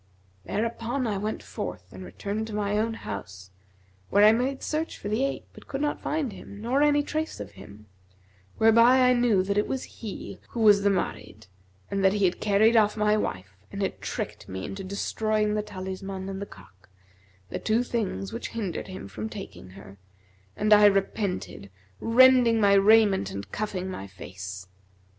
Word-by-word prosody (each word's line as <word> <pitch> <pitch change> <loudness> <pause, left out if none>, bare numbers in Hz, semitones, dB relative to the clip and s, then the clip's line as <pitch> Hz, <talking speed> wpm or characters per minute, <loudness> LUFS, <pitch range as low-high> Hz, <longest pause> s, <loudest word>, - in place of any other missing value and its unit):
Thereupon 230 +4 -2
I 205 -4 -1
went 215 +2 -3
forth - - -7
and - - -9
returned 210 +2 -4
to 215 - -6
my 205 -1 -1
own 225 +2 0
house, 95 - -8 0.6
where 205 +1 +5
I 215 - +8
made 255 +4 -1
search 310 +1 -2
for 205 - -6
the 220 +5 0
ape 275 - -2
but - - -15
could 270 - -4
not 295 0 -1
find 295 -7 -2
him 200 - -11
nor 245 +6 0
any 290 0 +4
trace 310 +2 -3
of 100 -1 -7
him; 105 +1 -13 0.7
whereby 230 +3 +6
I 250 0 +5
knew 240 -6 +3
that 200 +2 0
it 210 - 0
was 265 -1 -3 0.2
he 215 -4 -7
who 235 - -4
was 205 -2 +6
the 200 - +3
Marid, 190 - -3 0.5
and 195 0 -1
that 190 0 +5
he 205 -2 +2
had 180 - 0
carried 215 +3 +4
off 210 -1 +4
my 210 0 +3
wife 95 - -3 0.2
and 200 - -3
had 195 - -3
tricked - - -5
me 95 0 -5
into 195 0 -6
destroying 210 +2 -1
the 210 - 0
talisman 190 -1 -6
and 195 0 -5
the 200 - -5
cock, 95 0 -17 0.6
the - - -3
two 225 +2 +1
things 195 - -3
which - - -4
hindered 200 -6 -3
him 185 - -8
from 105 +3 -6
taking 95 -3 -9
her, 95 +1 -13 0.6
and 215 0 +4
I 210 0 +7
repented, 195 - 0 0.3
rending 245 -1 +5
my 200 -2 +5
raiment 200 - +5
and 100 +1 -7
cuffing 195 -3 -3
my 100 - -6
face. 95 0 -8
205 Hz, 180 wpm, -26 LUFS, 185-225 Hz, 0.7 s, I